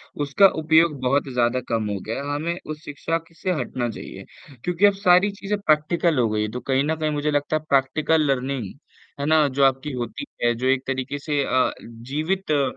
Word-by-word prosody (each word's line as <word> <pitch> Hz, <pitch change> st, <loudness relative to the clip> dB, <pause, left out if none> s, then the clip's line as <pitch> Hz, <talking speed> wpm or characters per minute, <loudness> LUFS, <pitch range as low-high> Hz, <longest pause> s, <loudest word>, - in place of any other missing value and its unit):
उसका 145 Hz, +7 st, +4 dB
उपयोग 160 Hz, -2 st, +3 dB
बहुत 135 Hz, +2 st, +1 dB
ज़्यादा 125 Hz, +1 st, +1 dB
कम 110 Hz, -2 st, -1 dB
हो 100 Hz, -1 st, -2 dB
गया 115 Hz, +5 st, -3 dB
है। 145 Hz, 0 st, -3 dB
हमें 170 Hz, +4 st, -2 dB
उस 155 Hz, 0 st, -7 dB
शिक्षा 155 Hz, +3 st, -2 dB
की -, -, -23 dB
से 185 Hz, -, -2 dB
हटना 120 Hz, -1 st, -2 dB
चाहिए 110 Hz, -, -9 dB, 0.4 s
क्योंकि 180 Hz, +3 st, +2 dB
अब 205 Hz, -, +5 dB
सारी 195 Hz, 0 st, +4 dB
चीज़ें 200 Hz, +1 st, -3 dB
प्रैक्टिकल 160 Hz, -2 st, +2 dB
हो 115 Hz, -, +2 dB
गई 105 Hz, 0 st, -1 dB
है, 105 Hz, -, -1 dB
तो 125 Hz, -, -4 dB
कहीं 135 Hz, +2 st, 0 dB
न 160 Hz, +2 st, 0 dB
कहीं 155 Hz, -1 st, -1 dB
मुझे 150 Hz, 0 st, -1 dB
लगता 145 Hz, +1 st, 0 dB
है 155 Hz, -, 0 dB
प्रैक्टिकल 140 Hz, +4 st, +2 dB
लर्निंग 130 Hz, -5 st, -2 dB, 0.5 s
है 140 Hz, -, -2 dB
ना? 155 Hz, -1 st, +4 dB
जो 140 Hz, 0 st, 0 dB
आपकी 135 Hz, +2 st, +2 dB
होती 120 Hz, -, -5 dB, 0.2 s
है 120 Hz, 0 st, +3 dB
जो 125 Hz, +3 st, -2 dB
एक 130 Hz, 0 st, +2 dB
तरीक़े 130 Hz, +1 st, -3 dB
से 145 Hz, -1 st, -1 dB
अ, 130 Hz, -1 st, +2 dB
जीवित 150 Hz, +11 st, -4 dB
अ, 145 Hz, -2 st, +3 dB
145 Hz, 210 wpm, -23 LUFS, 130-160 Hz, 0.5 s, अब